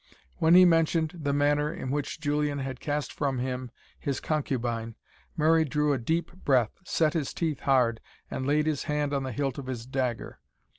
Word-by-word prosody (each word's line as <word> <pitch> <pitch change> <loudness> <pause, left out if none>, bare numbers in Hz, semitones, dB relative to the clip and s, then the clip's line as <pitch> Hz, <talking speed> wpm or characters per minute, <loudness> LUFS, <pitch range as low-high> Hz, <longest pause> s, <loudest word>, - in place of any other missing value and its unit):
When 160 +2 +5
he 185 0 +9
mentioned 165 -1 +3
the 145 -1 0
manner 145 +1 +2
in 130 -5 -5
which 145 +1 -2
Julian 150 -1 0
had 135 -2 -4
cast 145 -1 -2
from 140 -3 -1
him 125 0 -3 0.3
his 140 -2 -2
concubine, 120 -7 -2 0.4
Murray 160 +1 +4
drew 150 0 +1
a 135 - -1
deep 160 +8 -1
breath, 125 -6 +3
set 160 -3 +1
his 155 -5 -2
teeth 160 -4 -1
hard, 125 -4 +2 0.3
and 130 - -3
laid 150 +1 +2
his 150 -3 -1
hand 150 -1 -1
on 140 - +1
the 130 -1 -4
hilt 135 +2 -2
of 135 - -7
his 120 -3 -4
dagger. 130 -2 -3
145 Hz, 185 wpm, -28 LUFS, 130-150 Hz, 0.4 s, he